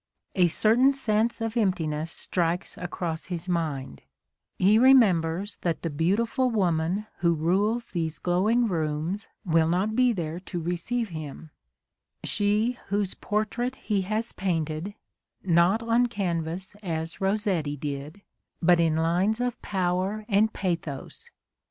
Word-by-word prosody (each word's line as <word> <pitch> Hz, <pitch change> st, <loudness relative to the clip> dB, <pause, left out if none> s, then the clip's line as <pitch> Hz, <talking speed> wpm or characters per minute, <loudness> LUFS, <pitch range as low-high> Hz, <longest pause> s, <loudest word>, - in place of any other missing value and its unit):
A 180 Hz, -3 st, +4 dB
certain 230 Hz, +10 st, +4 dB
sense 230 Hz, -3 st, 0 dB
of 225 Hz, 0 st, -2 dB
emptiness 165 Hz, -7 st, 0 dB
strikes 175 Hz, +1 st, -1 dB
across 175 Hz, -2 st, -4 dB
his 175 Hz, 0 st, -5 dB
mind, 150 Hz, -, -2 dB, 0.3 s
— -, -, -56 dB
he 205 Hz, +4 st, +5 dB
remembers 200 Hz, -7 st, +4 dB
that 170 Hz, -2 st, -2 dB
the 165 Hz, -, -2 dB
beautiful 225 Hz, -, +1 dB
woman 185 Hz, -2 st, 0 dB
who 170 Hz, -1 st, +3 dB
rules 200 Hz, +9 st, +1 dB
these 160 Hz, -3 st, -2 dB
glow 180 Hz, +6 st, +1 dB
ing 240 Hz, +1 st, +3 dB
rooms 160 Hz, +2 st, -2 dB, 0.2 s
will 165 Hz, -2 st, +3 dB
not 190 Hz, +6 st, 0 dB
be 250 Hz, 0 st, +4 dB
there 170 Hz, -5 st, -3 dB
to 180 Hz, -1 st, -5 dB
receive 180 Hz, +8 st, -2 dB
him, 155 Hz, -1 st, -8 dB, 0.3 s
— -, -, -60 dB, 0.3 s
she 215 Hz, +4 st, +1 dB
whose 200 Hz, -1 st, 0 dB
portrait 225 Hz, +4 st, -2 dB
he 210 Hz, -6 st, -1 dB
has 215 Hz, +5 st, -2 dB
painted, 165 Hz, +1 st, -2 dB, 0.5 s
not 180 Hz, +5 st, +3 dB
on 230 Hz, +2 st, +3 dB
canvas 180 Hz, -3 st, -3 dB
as 165 Hz, -3 st, -4 dB
Rossetti 190 Hz, -7 st, 0 dB
did, 145 Hz, +6 st, -6 dB, 0.4 s
but 175 Hz, 0 st, +4 dB
in 165 Hz, -2 st, +3 dB
lines 180 Hz, +7 st, +1 dB
of 245 Hz, -1 st, -2 dB
power 190 Hz, +2 st, -1 dB
and 215 Hz, +1 st, +3 dB
pathos. 165 Hz, -8 st, -4 dB
185 Hz, 135 wpm, -26 LUFS, 165-215 Hz, 0.5 s, he